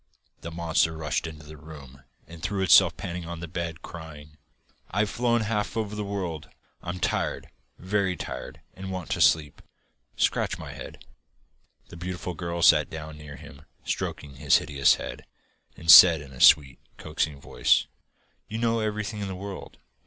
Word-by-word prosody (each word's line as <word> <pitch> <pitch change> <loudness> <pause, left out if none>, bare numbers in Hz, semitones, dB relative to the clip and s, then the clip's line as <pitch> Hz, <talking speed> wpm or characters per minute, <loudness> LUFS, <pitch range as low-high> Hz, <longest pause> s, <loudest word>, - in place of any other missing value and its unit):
The 85 - -7
monster 80 -1 0
rushed 80 +1 -2
into 75 -1 -10
the 75 +1 -12
room, 70 -3 -13 0.2
and 85 -1 -13
threw 95 +3 -2
itself 95 - +6
panting 85 -1 -6
on 85 -1 -6
the 85 - -6
bed, 85 -1 -5
crying: 75 -2 -11 0.5
'I've 100 +2 0
flown 120 -1 +1
half 105 0 -2
over 105 -2 -2
the 105 0 -3
world. 90 -7 -5 0.3
I'm 90 +1 -5
tired, - - -2 0.3
VERY 95 0 -1
tired, 65 -5 -7
and 95 0 -8
want 90 -3 -6
to - - -1
sleep 75 -4 +2 0.5
scratch - - 0
my - - -8
head.' - - -11 0.8
The - - -11
beautiful 90 +1 -5
girl 85 0 -4
sat 75 -3 +5
down 80 -1 -8
near 75 -1 -10
him, 75 0 -13 0.2
stroking 70 -2 -4
his - - +4
hideous 70 -1 +2
head, - - -8 0.5
and 80 0 +4
said 85 -3 +10
in 70 -2 -12
a 65 - -9
sweet 70 -3 +6 0.2
coaxing 75 -2 -3
voice: - - +2 0.6
'You 110 - -5
know 115 0 +1
everything 105 0 -3
in 100 - -3
the 95 - -5
world. 100 +1 -8
85 Hz, 165 wpm, -26 LUFS, 75-95 Hz, 0.8 s, said